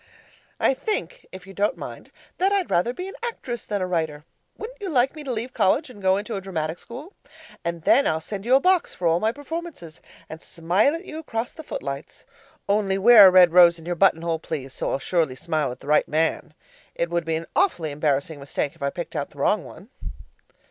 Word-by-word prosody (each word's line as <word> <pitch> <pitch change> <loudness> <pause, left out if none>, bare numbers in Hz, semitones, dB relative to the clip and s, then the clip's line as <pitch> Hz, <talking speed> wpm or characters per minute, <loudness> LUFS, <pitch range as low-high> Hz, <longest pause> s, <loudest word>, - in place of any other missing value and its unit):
I - - +3
think, 440 - -4
if 185 -1 -10
you 195 - -12
don't 205 +2 0
mind, - - -9 0.3
that 385 +2 +3
I'd 395 -3 0
rather 175 +7 +2
be 360 +9 -6
an 390 - -8
actress 260 - -5
than 205 -3 -2
a - - 0
writer. 160 -4 -2 0.3
Wouldn't - - -9
you 395 - -3
like 265 -1 +2
me 305 - -8
to 270 - -4
leave 240 +2 -4
college 270 - +1
and 205 -5 -14
go 190 0 +3
into 210 +2 -4
a 195 - -4
dramatic 165 -3 -4
school? 285 - -10 0.5
And 170 -1 -4
then 280 - +4
I'll 160 - +1
send 195 +4 -6
you 245 +4 +4
a - - +6
box 365 +2 +2
for 180 - -5
all 165 +1 +3
my 220 +3 +1
performances, 290 - -8 0.3
and 160 +1 -9
smile 180 - +1
at 335 +3 -8
you 315 - -7
across 235 -6 -4
the 320 - -10
footlights. 140 - -7 0.4
Only 200 -1 +1
wear 210 0 +9
a - - +8
red 180 -2 +6
rose 175 -1 +7
in 165 - -13
your 175 - -1
buttonhole, 170 -2 +2
please, 135 -5 -6
so - - -3
I'll - - 0
surely 155 -2 0
smile 155 -2 -2
at 125 - -10
the - - -13
right 150 - +3
man. 160 0 -1 0.4
It 170 0 -2
would 170 0 0
be 165 0 -1
an 165 +1 -4
awfully 285 - +1
embarrassing 145 +1 -1
mistake 140 +1 -3
if 165 - -24
I 140 - 0
picked 170 +4 -7
out 145 -2 -2
the - - -21
wrong 190 +8 +1
one. 205 - -13
185 Hz, 225 wpm, -24 LUFS, 160-255 Hz, 0.5 s, wear